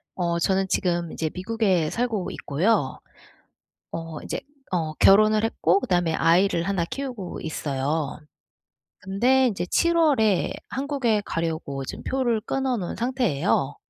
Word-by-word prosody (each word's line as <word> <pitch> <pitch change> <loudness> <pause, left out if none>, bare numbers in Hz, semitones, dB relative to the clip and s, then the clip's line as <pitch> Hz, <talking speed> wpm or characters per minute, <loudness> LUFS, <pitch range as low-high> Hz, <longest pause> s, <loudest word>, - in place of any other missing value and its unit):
어 170 -2 0
저는 190 +2 +1
지금 175 -3 0
이제 160 - -2
미국에 185 -4 0
살고 230 -6 -1
있고요. 155 -1 0 0.9
어 165 -2 -6
이제 - - -4 0.3
어 160 -4 -1
결혼을 215 +4 +5
했고 190 -4 +2
그 - - -5
다음에 175 -3 +1
아이를 170 +2 +3
하나 190 -1 0
키우고 245 -2 -5
있어요. 150 -1 -2 0.8
근데 250 +7 +2
인제 190 -7 -2
7 340 - +2
월에 240 - +3 0.2
한국에 265 -6 0
가려고 160 -4 -3
지금 - - -7
표를 250 -4 +1
끊어 265 +1 -1
놓은 180 -5 -4
상태예요. 195 - 0
190 Hz, 270 characters per minute, -24 LUFS, 165-230 Hz, 0.9 s, 결혼을